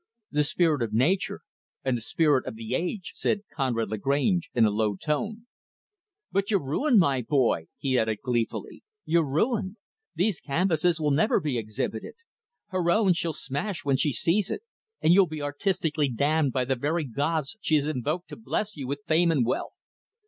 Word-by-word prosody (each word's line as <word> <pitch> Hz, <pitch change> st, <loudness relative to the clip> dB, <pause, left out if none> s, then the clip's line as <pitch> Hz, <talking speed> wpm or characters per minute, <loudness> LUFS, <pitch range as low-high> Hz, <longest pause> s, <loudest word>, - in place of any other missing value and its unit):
"'The 150 Hz, 0 st, +2 dB
Spirit 155 Hz, -2 st, +2 dB
of 110 Hz, -2 st, -2 dB
Nature' 155 Hz, -, +1 dB, 0.4 s
and 130 Hz, -2 st, +2 dB
'The 120 Hz, -, -4 dB
Spirit 145 Hz, +3 st, +2 dB
of -, -, -5 dB
the 110 Hz, +1 st, -5 dB
Age'," 180 Hz, -, -2 dB
said 205 Hz, -, 0 dB
Conrad 120 Hz, -7 st, -1 dB
Lagrange, 140 Hz, -, +1 dB
in 115 Hz, -2 st, +5 dB
a 105 Hz, -, +3 dB
low 105 Hz, -1 st, 0 dB
tone. 210 Hz, -, -3 dB, 0.9 s
"But 195 Hz, 0 st, 0 dB
you're 200 Hz, -7 st, +2 dB
ruined, 245 Hz, -, +2 dB
my 140 Hz, -9 st, +3 dB
boy," 120 Hz, -, +1 dB
he 130 Hz, -2 st, +1 dB
added 110 Hz, -1 st, 0 dB
gleefully. 120 Hz, -3 st, -2 dB, 0.2 s
"You're 165 Hz, -3 st, +2 dB
ruined. 205 Hz, -, 0 dB, 0.4 s
These 190 Hz, -1 st, +1 dB
canvases 165 Hz, +2 st, +1 dB
will 150 Hz, -2 st, +1 dB
never 165 Hz, +12 st, +3 dB
be 145 Hz, -8 st, -1 dB
exhibited 110 Hz, 0 st, -4 dB, 0.5 s
Her 185 Hz, -2 st, 0 dB
own, 195 Hz, 0 st, +4 dB
she'll 170 Hz, -1 st, -1 dB
smash 155 Hz, +7 st, -4 dB
when 140 Hz, -1 st, +3 dB
she 150 Hz, +1 st, +1 dB
sees 175 Hz, -, +1 dB
it; 425 Hz, -, -4 dB, 0.4 s
and 165 Hz, -, +5 dB
you'll 190 Hz, 0 st, +6 dB
be 155 Hz, -2 st, -5 dB
artistically 150 Hz, -1 st, 0 dB
damned 145 Hz, +4 st, +1 dB
by 130 Hz, 0 st, 0 dB
the 135 Hz, +1 st, 0 dB
very 155 Hz, +6 st, -1 dB
gods 145 Hz, -, -1 dB
she 155 Hz, -, +2 dB
has 145 Hz, -2 st, +2 dB
invoked 155 Hz, +4 st, -2 dB
to -, -, -7 dB
bless 215 Hz, -1 st, -3 dB
you 140 Hz, -4 st, -6 dB
with 140 Hz, +1 st, -4 dB
fame 165 Hz, +2 st, +3 dB
and 135 Hz, -7 st, +2 dB
wealth. 120 Hz, -, -2 dB
150 Hz, 180 wpm, -27 LUFS, 130-180 Hz, 0.9 s, you'll